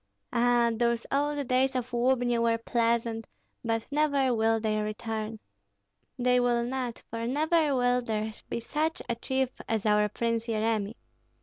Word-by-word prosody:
Ah, 240 0 +3
those 235 0 0
old 290 0 0
days 260 +1 +2
of 250 0 -2
Lubni 245 -1 +2
were 230 0 +2
pleasant, 230 -1 0 0.4
but 225 -1 -1
never 285 -3 +2
will 225 0 +2
they 215 -1 0
return. 215 +1 -4 0.8
They 250 0 +3
will 240 -1 +2
not, 250 -1 -3
for 230 0 -3
never 305 +2 +2
will 245 0 +2
there 220 -2 -2 0.2
be - - -2
such 310 +7 -2
a - - 0
chief 265 +2 -1 0.2
as 220 -2 0
our 210 0 +3
Prince 230 +2 -1
Yeremi. 220 -1 0
235 Hz, 145 wpm, -28 LUFS, 225-255 Hz, 0.8 s, Ah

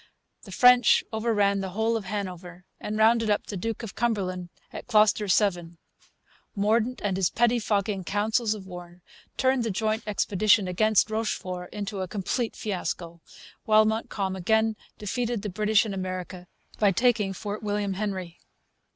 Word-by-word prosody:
The 195 - -11
French 250 +5 +6
overran 210 -3 +1
the 190 -1 -3
whole 225 +1 +1
of 220 -3 -3
Hanover 180 -3 -6
and 215 - -4
rounded 225 0 +4
up 205 - +1
the 205 - -6
Duke 225 +5 -4
of 220 - -6
Cumberland 185 -6 -2 0.2
at - - -8
Kloster 215 -2 +3
Seven. 175 -4 +1 0.8
Mordaunt 220 +4 +1
and 195 -2 0
his 190 -2 +2
pettifogging 215 -4 0
councils 215 +3 0
of 200 -3 -10
war 175 -1 -11 0.3
turned 260 -2 +2
the 225 - -1
joint 215 +3 -1
expedition 205 0 +2
against 215 +3 +2
Rochefort 185 -5 -3
into 200 -1 -4
a 185 - -3
complete 215 +5 -2
fiasco; 175 -4 -4 0.4
while 215 0 +5
Montcalm 215 -3 -2
again 220 +4 +1 0.2
defeated 230 +2 -3
the 210 - -3
British 215 +3 +2
in 210 - -4
America 185 -1 -5 0.3
by 205 -2 +4
taking 220 -1 +2
Fort 205 +2 -5
William 205 -2 -1
Henry. 190 -4 -4
205 Hz, 150 wpm, -26 LUFS, 185-220 Hz, 0.8 s, French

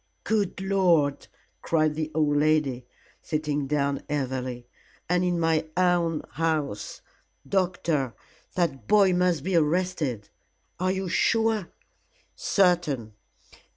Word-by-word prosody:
"Good 205 -4 0
Lord!" 180 -7 +2 0.3
cried 155 -2 +1
the 155 0 -3
old 150 -2 +2
lady, 145 -5 +1 0.3
sitting 150 -2 -2
down 140 -1 0
heavily, 130 -3 -3 0.4
"and 180 +1 +2
in 175 -1 0
my 165 -1 +1
own 175 -3 +2
house. 155 -9 -2 0.5
Doctor, 170 -9 0 0.4
that 140 - -1
boy 200 -3 +5
must 180 -5 +1
be 190 0 -1
arrested. 155 - 0 0.5
Are 185 +1 +1
you 190 0 -2
sure?" 220 +1 +1 0.7
"Certain. 170 - +1
160 Hz, 105 wpm, -26 LUFS, 145-180 Hz, 0.7 s, boy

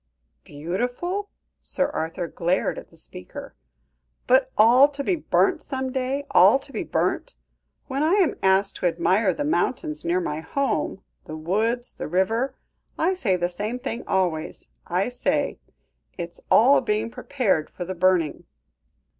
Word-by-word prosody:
"Beautiful?" 245 - -3 0.3
Sir 275 - 0
Arthur 165 - -3
glared 175 +3 -1
at - - -14
the 165 - -20
speaker. 90 - -9 0.7
"But 260 +1 +3
all 240 +6 +7
to 280 0 -5
be 365 - +1
burnt 315 - +1
some 265 -1 -4
day 265 +2 -2
all 195 +8 +7
to 275 0 -14
be - - -2
burnt. - - -1 0.5
When 275 0 -3
I 315 +4 +3
am 390 -5 +3
asked 190 +1 +2
to 180 - +1
admire 185 +4 +2
the 165 - -3
mountains 155 - -1
near 175 +2 +1
my 155 -4 -3
home 260 - -2 0.2
the 155 - -7
woods, 220 +9 -1
the - - -6
river 225 - 0 0.4
I 355 +4 +2
say 225 - +1
the 175 -1 0
same 210 +7 -4
thing 235 -2 -5
always; 175 -5 -1 0.2
I 180 +4 0
say, 245 0 -1 0.6
'It 170 -1 -5
is - - -10
all 265 +6 +6
being 220 -1 -1
prepared 235 - -1
for 180 - -6
the 185 - -4
burning.'" 180 -3 +1
210 Hz, 155 wpm, -24 LUFS, 175-265 Hz, 0.7 s, all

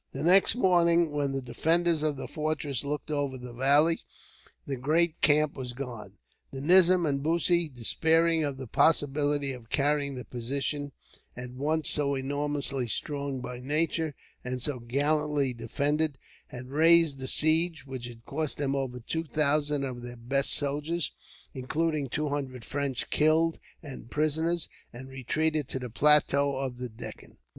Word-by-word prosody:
The - - -4
next 185 +6 +5
morning, 170 -6 +3
when 145 -2 -1
the 135 -1 -3
defenders 165 +6 +1
of 155 -1 0
the 135 - -6
fortress 150 -4 -2
looked 150 +2 -4
over 140 -3 -1
the 125 -1 -9
valley, 145 +6 +3 0.7
the 140 - -3
great 155 +6 +1
camp 150 0 +4
was 125 -2 -6
gone. 120 -6 -7 0.4
The 135 - -7
nizam 180 +3 +5
and 140 -2 0
Bussy, 170 +2 +2
despairing 160 +6 +2
of 140 -2 -3
the 130 - -7
possibility 145 +1 +2
of 120 -3 -12
carrying 145 -1 0
the 125 -2 -7
position, 140 +5 -3 0.5
at 125 0 -7
once 150 +4 -1
so 140 -1 +2
enormously 140 -1 -2
strong 140 +2 -2
by 125 -1 -6
nature, 150 +2 -1 0.3
and 125 0 -4
so 125 +1 -2
gallantly 145 +2 0
defended, 145 +4 -1 0.3
had 125 -2 -9
raised 160 -1 +5
the 130 - -4
siege; 160 0 +2
which 130 -3 -6
had 115 -1 -13
cost 155 +1 -2
them 140 -1 -1
over 130 -2 -3
two 160 +7 -3
thousand 150 -2 0
of 125 -3 -5
their 120 0 -8
best 135 +4 -1
soldiers, 150 +3 -1 0.4
including 150 +2 -1
two 150 +4 -2
hundred 130 -4 -4
French 140 -3 -3
killed 160 +2 +2 0.2
and 135 -5 -9
prisoners, 160 +3 0 0.2
and 130 +3 -10
retreated 150 +3 -1
to - - -4
the 125 -3 -6
plateau 140 +1 +3
of 130 -2 -4
the 125 -1 -5
Deccan. 110 +2 -10
145 Hz, 155 wpm, -28 LUFS, 130-155 Hz, 0.7 s, next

